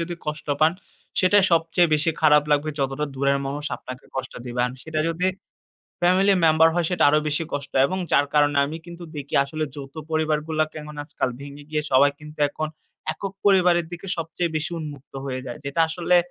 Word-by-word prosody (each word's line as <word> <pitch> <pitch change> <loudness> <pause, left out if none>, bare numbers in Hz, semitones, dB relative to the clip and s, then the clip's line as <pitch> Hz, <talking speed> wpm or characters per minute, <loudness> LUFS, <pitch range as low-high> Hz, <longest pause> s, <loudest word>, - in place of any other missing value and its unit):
যদি 170 +1 -3
কষ্ট 150 0 -4
পান 155 +1 +5 0.5
সেটা 190 +2 +5
সবচেয়ে 165 +1 +3
বেশি 155 +2 +1
খারাপ 150 -1 +6
লাগবে 150 +1 +2
যতটা 135 +2 -1
দূরের 140 +1 +2
মানুষ 145 +2 -4
আপনাকে 130 0 -9
কষ্ট 130 0 -4
দিবেন। 125 0 0
আর 130 - -18
সেটা 160 -1 -3
যদি 170 +2 0 0.7
ফ্যামিলি 185 +3 +4
মেম্বার 160 0 +6
হয় 175 -2 +1
সেটা 180 - +1
আরও 150 +1 +4
বেশি 150 +3 -1
কষ্ট 140 -1 -4
এবং 185 - -3
যার 145 - +4
কারণে 145 -1 +4
আমি 150 +3 -4
কিন্তু 175 0 -10
দেখি 145 -1 -6
আসলে 155 +2 -3
যৌথ 140 -1 -9 0.2
পরিবারগুলাকে 155 0 0
এখন 150 0 -10
আজকাল 145 - -2
ভেঙে 140 +1 -9
গিয়ে 150 -1 0
সবাই 140 +2 +6
কিন্তু 150 0 -12
এখন 155 +2 -4 0.4
একক-পরিবারের 190 -3 +2
দিকে 175 +3 -7
সবচেয়ে 165 +1 -2
বেশি 155 +2 -2
উন্মুক্ত 145 -4 -8
হয়ে 130 -1 -3
যায়। 125 +4 -6
যেটা 140 +4 -1
আসলে 175 +2 +2
155 Hz, 180 wpm, -24 LUFS, 145-165 Hz, 0.7 s, খারাপ